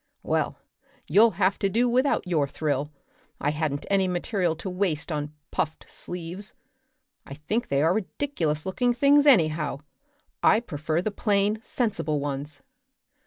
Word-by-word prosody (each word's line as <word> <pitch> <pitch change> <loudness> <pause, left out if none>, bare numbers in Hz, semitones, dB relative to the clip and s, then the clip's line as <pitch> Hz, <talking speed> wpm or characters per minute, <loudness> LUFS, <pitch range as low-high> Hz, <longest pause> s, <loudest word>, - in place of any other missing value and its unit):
"Well, - - 0 0.5
you'll 215 +8 +5
have 195 0 +2
to 195 - +1
do 235 +5 +2
without 255 +4 +2
your 160 -6 +1
thrill. 145 -1 -2 0.5
I 145 - +1
hadn't 150 -2 -2
any 195 -1 +2
material 180 -1 0
to 165 - -7
waste 180 -4 -1
on 150 -1 -3 0.2
puffed 155 0 -2
sleeves. 180 +4 -6 0.7
I 140 - -9
think 210 +11 -2
they 140 +1 +1
are 165 +2 +4
ridiculous 180 - -2
looking 245 +6 +1
things 285 +3 +5
anyhow. 155 - +3 0.6
I 220 - +5
prefer 160 -5 -2
the 215 - -1
plain, 205 0 +1
sensible 200 - -1
ones." 140 0 -5
180 Hz, 140 wpm, -26 LUFS, 150-215 Hz, 0.7 s, you'll